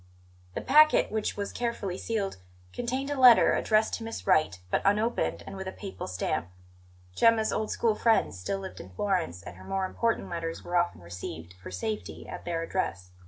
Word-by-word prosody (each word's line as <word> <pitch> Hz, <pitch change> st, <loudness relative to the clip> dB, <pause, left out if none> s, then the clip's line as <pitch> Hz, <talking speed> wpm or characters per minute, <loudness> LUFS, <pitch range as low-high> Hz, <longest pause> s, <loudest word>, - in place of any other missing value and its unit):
The -, -, -2 dB
packet, 305 Hz, +3 st, +5 dB
which 215 Hz, -1 st, -2 dB
was 200 Hz, 0 st, -3 dB
carefully 235 Hz, -6 st, -3 dB
sealed, 210 Hz, -, -2 dB, 0.4 s
contained 260 Hz, +4 st, -2 dB
a 285 Hz, -, -2 dB
letter, 250 Hz, -3 st, +8 dB
addressed 215 Hz, 0 st, +2 dB
to 230 Hz, -, -3 dB
Miss 225 Hz, 0 st, -6 dB
Wright, 100 Hz, -12 st, +3 dB
but -, -, +2 dB
unopened 215 Hz, +4 st, +1 dB
and -, -, -8 dB
with 190 Hz, -1 st, -6 dB
a -, -, -3 dB
Papal 195 Hz, 0 st, -7 dB
stamp. 90 Hz, -2 st, -2 dB, 0.7 s
Gemma's 225 Hz, -, +4 dB
old 215 Hz, 0 st, -1 dB
school 230 Hz, -2 st, +1 dB
friends 220 Hz, -, +2 dB
still 195 Hz, -, -2 dB
lived 190 Hz, -1 st, -8 dB
in 95 Hz, -, -9 dB
Florence, 160 Hz, -, -1 dB
and 85 Hz, -, -9 dB
her 95 Hz, -, -12 dB
more 190 Hz, -, -1 dB
important 230 Hz, +4 st, -1 dB
letters 165 Hz, -1 st, -4 dB
were 175 Hz, -, -4 dB
often 175 Hz, -, +1 dB
received, 85 Hz, -1 st, -8 dB
for -, -, -8 dB
safety, 90 Hz, -4 st, -5 dB
at -, -, -8 dB
their 165 Hz, -1 st, -2 dB
address. 95 Hz, -, -3 dB
190 Hz, 185 wpm, -28 LUFS, -, 0.7 s, letter